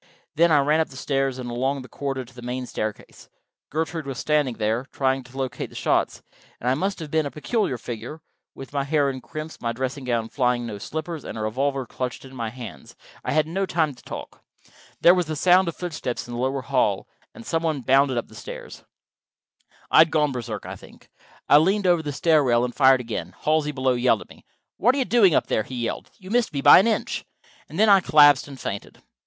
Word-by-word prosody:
Then 165 Hz, +2 st, +4 dB
I 150 Hz, -, +6 dB
ran 150 Hz, +3 st, +2 dB
up 160 Hz, -, 0 dB
the 130 Hz, -, -12 dB
stairs 135 Hz, -1 st, -1 dB
and 125 Hz, -1 st, -6 dB
along 130 Hz, +3 st, -1 dB
the -, -, -11 dB
corridor 135 Hz, -2 st, -4 dB
to 120 Hz, -, -18 dB
the 125 Hz, -, -11 dB
main 125 Hz, +1 st, -4 dB
staircase. 110 Hz, -3 st, -6 dB, 0.4 s
Gertrude 160 Hz, 0 st, -3 dB
was 135 Hz, -3 st, -5 dB
standing 150 Hz, -4 st, +1 dB
there, 110 Hz, +4 st, -1 dB
trying 135 Hz, -1 st, 0 dB
to 125 Hz, +2 st, -14 dB
locate 130 Hz, -1 st, -3 dB
the -, -, -16 dB
shots, -, -, 0 dB, 0.4 s
and 125 Hz, -, -5 dB
I 125 Hz, -, +4 dB
must 190 Hz, +8 st, -1 dB
have 155 Hz, -4 st, -8 dB
been 155 Hz, -2 st, +1 dB
a -, -, -4 dB
peculiar 155 Hz, -, -1 dB
figure, 120 Hz, +6 st, -7 dB, 0.4 s
with 135 Hz, +1 st, -10 dB
my 140 Hz, -1 st, 0 dB
hair 145 Hz, -1 st, +1 dB
in 130 Hz, -1 st, -8 dB
crimps, 155 Hz, +6 st, -8 dB
my 115 Hz, -, -1 dB
dressing 130 Hz, +3 st, -4 dB
gown 115 Hz, -2 st, 0 dB
flying, 125 Hz, -2 st, 0 dB
no 105 Hz, -3 st, -6 dB
slippers, 160 Hz, -, -5 dB
and -, -, -7 dB
a -, -, -4 dB
revolver 135 Hz, +5 st, -1 dB
clutched 125 Hz, +2 st, -5 dB
in 130 Hz, 0 st, -12 dB
my 115 Hz, -3 st, -3 dB
hands 120 Hz, -, -10 dB, 0.3 s
I -, -, -2 dB
had 155 Hz, 0 st, +3 dB
no 190 Hz, +5 st, -2 dB
time 160 Hz, -5 st, 0 dB
to 125 Hz, -, -18 dB
talk. -, -, -9 dB, 0.6 s
There 175 Hz, -, +8 dB
was 180 Hz, -3 st, 0 dB
the 155 Hz, -, -3 dB
sound 180 Hz, +4 st, +4 dB
of 170 Hz, -, -3 dB
footsteps 155 Hz, -10 st, -4 dB
in 120 Hz, -, -7 dB
the 120 Hz, -, -4 dB
lower 130 Hz, +1 st, -1 dB
hall, 125 Hz, -7 st, 0 dB, 0.3 s
and 115 Hz, -, -11 dB
some 165 Hz, -, -1 dB
one 155 Hz, -4 st, -1 dB
bounded 135 Hz, +1 st, +3 dB
up 120 Hz, -, -2 dB
the -, -, -18 dB
stairs. -, -, -9 dB, 1.1 s
I -, -, +6 dB
had 160 Hz, 0 st, +7 dB
gone 150 Hz, -2 st, +2 dB
Berserk, 125 Hz, -4 st, -5 dB
I -, -, -6 dB
think. -, -, -17 dB, 0.4 s
I 145 Hz, -, +7 dB
leaned 195 Hz, +5 st, +1 dB
over 175 Hz, -2 st, +4 dB
the 150 Hz, -2 st, -4 dB
stair 155 Hz, +1 st, +3 dB
rail 120 Hz, -2 st, +3 dB
and 125 Hz, -, -5 dB
fired 130 Hz, -2 st, +5 dB
again. 100 Hz, -7 st, -5 dB
Halsey, 155 Hz, -1 st, +2 dB
below, 130 Hz, -2 st, +1 dB
yelled 120 Hz, -3 st, +2 dB
at -, -, -13 dB
me. -, -, -17 dB, 0.3 s
"What 245 Hz, +6 st, +3 dB
are -, -, -2 dB
you 265 Hz, -, +1 dB
doing 205 Hz, -11 st, +4 dB
up -, -, +2 dB
there?" -, -, 0 dB
he 130 Hz, -, -8 dB
yelled. 120 Hz, -1 st, -4 dB
"You 190 Hz, 0 st, -11 dB
missed 240 Hz, -5 st, +1 dB
me 140 Hz, -, -2 dB
by -, -, +9 dB
an 195 Hz, -, +3 dB
inch." 225 Hz, -, -1 dB, 0.5 s
And -, -, -8 dB
then 220 Hz, -, +5 dB
I 200 Hz, -2 st, +7 dB
collapsed 145 Hz, -5 st, +6 dB
and 135 Hz, -2 st, -10 dB
fainted. 100 Hz, 0 st, -6 dB
135 Hz, 230 wpm, -24 LUFS, 125-160 Hz, 1.1 s, by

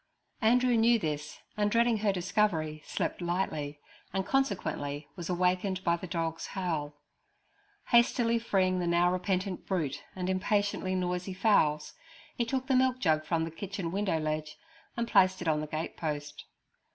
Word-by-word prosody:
Andrew 245 Hz, +2 st, +4 dB
knew 230 Hz, +1 st, +5 dB
this, 150 Hz, -6 st, -4 dB, 0.2 s
and 210 Hz, 0 st, +1 dB
dreading 235 Hz, +1 st, +3 dB
her 210 Hz, -1 st, +2 dB
discovery, 180 Hz, -5 st, 0 dB
slept -, -, -2 dB
lightly, 155 Hz, -5 st, -2 dB, 0.3 s
and 190 Hz, 0 st, -1 dB
consequently 155 Hz, -, -1 dB
was 175 Hz, -1 st, -6 dB
awakened 185 Hz, +1 st, 0 dB
by 170 Hz, -, +3 dB
the 175 Hz, +2 st, -7 dB
dog's 165 Hz, -1 st, -3 dB
howl. 155 Hz, -6 st, -2 dB, 0.9 s
Hastily 235 Hz, -1 st, +4 dB
freeing 185 Hz, -5 st, +1 dB
the 175 Hz, -, -1 dB
now 175 Hz, +1 st, +3 dB
repentant 185 Hz, 0 st, -2 dB
brute 170 Hz, -8 st, -1 dB
and 180 Hz, -1 st, -3 dB
impatiently 190 Hz, 0 st, 0 dB
noisy 180 Hz, +1 st, -2 dB
fowls, 155 Hz, -7 st, +2 dB, 0.4 s
he 235 Hz, -, 0 dB
took 260 Hz, +2 st, -2 dB
the 265 Hz, -1 st, +2 dB
milk 255 Hz, 0 st, +3 dB
jug 155 Hz, -9 st, +2 dB
from 165 Hz, 0 st, 0 dB
the 165 Hz, -, -4 dB
kitchen 185 Hz, 0 st, -5 dB
window 195 Hz, -3 st, 0 dB
ledge 155 Hz, 0 st, -3 dB, 0.4 s
and 235 Hz, 0 st, -1 dB
placed 185 Hz, -4 st, +4 dB
it 175 Hz, -, -5 dB
on 155 Hz, -1 st, +2 dB
the 155 Hz, -, -4 dB
gate 155 Hz, +2 st, -4 dB
post. 145 Hz, -2 st, -4 dB
185 Hz, 155 wpm, -30 LUFS, 160-210 Hz, 0.9 s, knew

